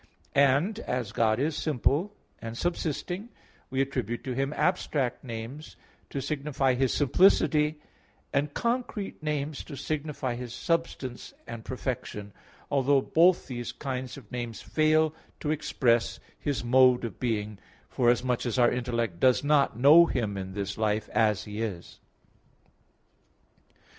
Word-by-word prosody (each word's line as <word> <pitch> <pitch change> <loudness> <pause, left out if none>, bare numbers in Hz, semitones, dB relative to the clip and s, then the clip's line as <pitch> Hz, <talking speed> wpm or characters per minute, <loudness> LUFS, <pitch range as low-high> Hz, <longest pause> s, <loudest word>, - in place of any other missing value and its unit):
And 140 +10 +3
as 125 - -3
God 110 -1 +2
is 150 +3 0
simple, 155 - +1 0.3
and 115 0 -6
subsisting, 175 - -2 0.4
we 130 +1 0
attribute 125 -4 -2
to 130 - -3
Him 135 +2 -1
abstract 150 -9 0
names 120 +5 -7 0.3
to 135 - -4
signify 140 -3 0
His 130 0 +1
simplicity, 150 -1 +3 0.5
and 145 +1 +1
concrete 235 - -2
names 150 -1 -2
to 145 - -8
signify 145 -3 -3
His 120 -1 -6
substance 165 -7 -2
and 115 -1 -7
perfection, 110 -5 -5 0.4
although 140 0 +3
both 175 +2 +4
these 120 -3 -5
kinds 130 -2 -5
of 120 -7 -14
names 120 -2 -4
fail 155 0 +2 0.3
to 150 - -1
express 120 -6 +1 0.2
His 145 -4 -2
mode 125 0 +5
of 110 -6 -7
being, 105 -4 -2 0.3
forasmuch 125 0 +1
as 120 - -1
our 120 -1 +5
intellect 120 -7 -2
does 130 0 +4
not 145 -5 +3
know 150 +7 +8
Him 110 -9 -1
in 95 -1 -5
this 100 +1 -4
life 110 -1 0
as 105 -3 +2
He 105 +1 -6
is. 100 -7 -5
130 Hz, 135 wpm, -28 LUFS, 115-150 Hz, 0.5 s, know